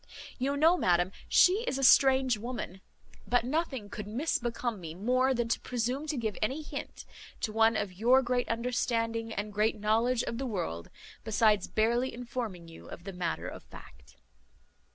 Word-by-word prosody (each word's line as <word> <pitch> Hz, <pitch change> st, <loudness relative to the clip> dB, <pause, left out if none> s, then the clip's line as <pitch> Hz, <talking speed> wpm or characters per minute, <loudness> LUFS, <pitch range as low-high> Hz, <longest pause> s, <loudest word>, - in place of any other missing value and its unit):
You 275 Hz, +2 st, 0 dB
know, 325 Hz, +5 st, +5 dB
madam, 180 Hz, -, +2 dB, 0.2 s
she 390 Hz, +5 st, +5 dB
is -, -, -1 dB
a 270 Hz, -, -2 dB
strange 265 Hz, -1 st, +5 dB
woman; 215 Hz, -4 st, -6 dB, 0.5 s
but 245 Hz, -1 st, +2 dB
nothing 265 Hz, -4 st, -2 dB
could 205 Hz, 0 st, -7 dB
misbecome 240 Hz, -2 st, -2 dB
me 165 Hz, -2 st, -8 dB
more 255 Hz, +7 st, +2 dB
than 240 Hz, -2 st, 0 dB
to -, -, +1 dB
presume 250 Hz, +5 st, -2 dB
to 300 Hz, -2 st, -2 dB
give 220 Hz, -4 st, -2 dB
any 265 Hz, +8 st, -1 dB
hint -, -, -7 dB, 0.4 s
to 220 Hz, -, -1 dB
one 225 Hz, 0 st, +4 dB
of 205 Hz, -3 st, -3 dB
your 245 Hz, +7 st, +4 dB
great 245 Hz, 0 st, -1 dB
understanding 230 Hz, -1 st, -1 dB
and 210 Hz, -1 st, -4 dB
great 215 Hz, +1 st, +1 dB
knowledge 230 Hz, +4 st, +2 dB
of 230 Hz, -, -4 dB
the 270 Hz, -, -2 dB
world, 130 Hz, -, -4 dB, 0.3 s
besides 215 Hz, -2 st, +2 dB
barely 235 Hz, +4 st, +1 dB
informing 235 Hz, -8 st, -5 dB
you 165 Hz, -, -13 dB
of 175 Hz, -, -10 dB
the 195 Hz, 0 st, -7 dB
matter 175 Hz, -2 st, -3 dB
of -, -, -8 dB
fact. 65 Hz, 0 st, -15 dB
230 Hz, 170 wpm, -30 LUFS, 210-255 Hz, 0.5 s, know